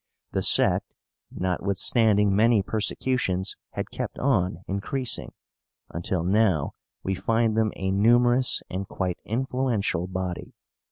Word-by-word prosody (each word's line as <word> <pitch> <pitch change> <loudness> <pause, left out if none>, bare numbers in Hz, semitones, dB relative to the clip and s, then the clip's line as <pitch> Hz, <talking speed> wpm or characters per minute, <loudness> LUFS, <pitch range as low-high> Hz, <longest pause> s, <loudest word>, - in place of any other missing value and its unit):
The - - -1
sect, - - +2 0.3
notwithstanding 100 +3 +2
many 110 -1 +4
persecutions, 105 -2 -1 0.2
had - - -4
kept - - -5
on 95 -9 0
increasing, 115 +6 -1 0.6
until 85 +1 -2
now 95 -5 +2 0.3
we 95 - -1
find 115 +3 +1
them 110 -1 +2
a 95 0 -2
numerous 120 +5 +3
and 95 +1 -4
quite 90 -2 -3
influential 115 -7 -1
body. 95 -1 -5
100 Hz, 110 wpm, -25 LUFS, 95-115 Hz, 0.6 s, many